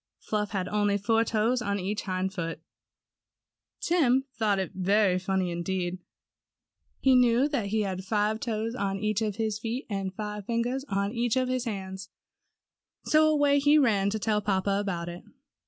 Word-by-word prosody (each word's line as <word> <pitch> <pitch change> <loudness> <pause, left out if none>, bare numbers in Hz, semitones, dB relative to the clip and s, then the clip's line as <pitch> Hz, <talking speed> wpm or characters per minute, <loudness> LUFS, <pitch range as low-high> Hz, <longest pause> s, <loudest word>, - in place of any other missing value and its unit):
Fluff 210 -1 -2
had 190 -4 -2
only 205 0 +1
four 225 +3 +2
toes 230 +3 +1
on 200 -3 -1
each 200 +3 -2
hind 190 0 -2
foot. 165 -3 -4 1.2
Tim 270 -7 +3
thought 215 -2 +1
that 190 -1 -2
very 190 0 +2
funny 190 -1 -1
indeed. 175 +1 -2 1.0
He 265 - +5
knew 250 +1 +4
that 255 -9 -1
he 215 +2 0
had 190 -1 -3
five 210 +2 0
toes 225 -1 -2
on 200 -5 -2
each 215 +1 -1
of 210 -3 -1
his 220 -1 -2
feet, 235 +5 -4
and 195 -1 -2
five 210 0 -6
fingers 240 +3 -1
on 200 -4 -1
each 235 0 0
of 255 -1 +1
his 255 -1 -1
hands, 190 -3 -5 1.0
so 310 0 +4
away 290 -2 +3
he 290 +2 +5
ran 210 -8 +3
to 215 - -1
tell 215 0 0
papa 195 0 0
about 175 -4 -3
it. 175 0 -7
210 Hz, 170 wpm, -28 LUFS, 195-235 Hz, 1.2 s, He